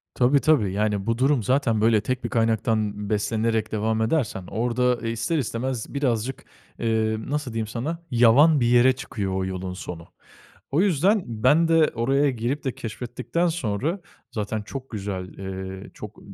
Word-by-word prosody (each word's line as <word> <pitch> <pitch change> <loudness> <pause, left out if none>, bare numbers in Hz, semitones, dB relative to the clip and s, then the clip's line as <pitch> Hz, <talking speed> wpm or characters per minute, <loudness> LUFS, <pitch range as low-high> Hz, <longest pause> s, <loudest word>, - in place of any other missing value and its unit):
Tabii 130 +3 +4
tabii. 130 -12 +3
Yani 105 -1 0
bu 115 0 0
durum 135 -1 +2
zaten 125 -2 +1
böyle 110 -1 +4
tek 130 +4 -3
bir - - -2
kaynaktan 110 -3 0
beslenerek 110 +1 0
devam 110 +1 0
edersen 110 - -1
orda 120 +1 0
ister 115 +8 -1
istemez 125 -1 -3
birazcık, 130 -3 -1 0.3
eee, 110 -1 +1
nasıl 145 -4 -3
diyeyim 110 -1 -2
sana, 145 +10 -4
yavan 125 +6 +6
bir 120 - +2
yere 120 +2 +5
çıkıyor 100 -7 -4
o 95 0 -1
yolun 95 -1 -4
sonu. 85 -2 -8 0.7
O 155 - +4
yüzden 195 +2 +3
ben 130 +9 +3
de 165 -1 +4
oraya 135 +5 +2
girip 125 +3 -2
de 130 -3 -2
keşfettikten 120 +9 -3
sonra 155 - -1 0.3
zaten 105 0 -3
çok 130 +5 -8
güzel, 95 -4 -5
ııı, 95 0 -6
çok, - - -10
115 Hz, 155 wpm, -24 LUFS, 105-135 Hz, 0.7 s, yavan